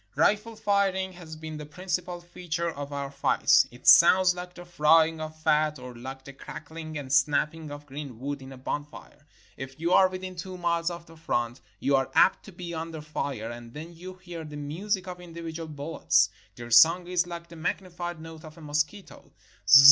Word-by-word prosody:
Rifle 210 +9 +2
firing 200 -3 +1
has 170 -3 -10
been 155 0 -7
the 150 - -7
principal 180 +2 -3
feature 170 -1 -3
of 145 -1 -7
our 140 -1 -4
fights. - - +4
It 120 +1 -16
sounds 185 +2 +8
like 180 0 -8
the 175 - -10
frying 160 -1 +4
of 155 0 -6
fat, 155 -1 +2
or 125 0 -9
Hke 130 +3 -8
the 140 - -10
crackling 155 +3 -8
and 135 -2 -4
snapping 150 +2 +2
of 145 0 -8
green 140 -4 -8
wood 140 +2 -4
in 130 0 -10
a 135 - -10
bonfire. 145 +2 -7 0.3
If 135 +2 -8
you 170 +2 0
are 190 - +6
within 185 0 -6
two 185 +1 -6
miles 170 -1 0
of 170 -1 -7
the 165 - -15
front, 120 -6 -2 0.2
you 140 - +2
are 135 -1 +1
apt - - +5
to 200 - -10
be 175 -1 -7
under 160 0 -5
fire, 140 -6 -4
and 120 +1 -10
then 160 +3 -8
you 180 +3 -9
hear 175 -3 -8
the 150 -1 -8
music 185 +7 -2
of 180 -1 -7
individual 165 -1 -7
bullets. 145 -9 +1 0.2
Their 120 -1 -9
song 165 +10 +7
is 180 0 0
like 170 -1 -7
the 170 - -11
magnified 175 +1 -4
note 160 0 -10
of 155 0 -12
a - - -12
mosquito. 150 +6 -3
160 Hz, 195 wpm, -27 LUFS, 145-175 Hz, 0.3 s, sounds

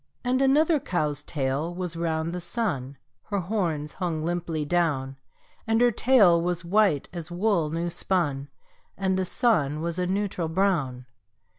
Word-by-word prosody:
And 255 +1 +1
another 300 +4 +4
cow's 155 - -1
tail 145 +2 -2
was 180 -2 -4
round 165 0 -1
the 180 - -4
sun 170 - -2 0.3
(Her 200 -1 -2
horns 170 -6 -2
hung 165 -4 -2
limply 170 -3 -2
down); 145 -5 0 0.5
And 225 0 +2
her 245 0 +5
tail 205 -8 +5
was 175 0 -2
white 190 -5 +2
as 170 -2 -6
wool 175 -3 +1
new 170 +2 -2
spun, 150 -6 -1 0.5
And 190 -1 0
the 185 0 0
sun 155 - +1
was 170 +2 -3
a 180 - 0
neutral 190 -3 -1
brown. 160 -9 0
175 Hz, 150 wpm, -26 LUFS, 155-195 Hz, 0.5 s, her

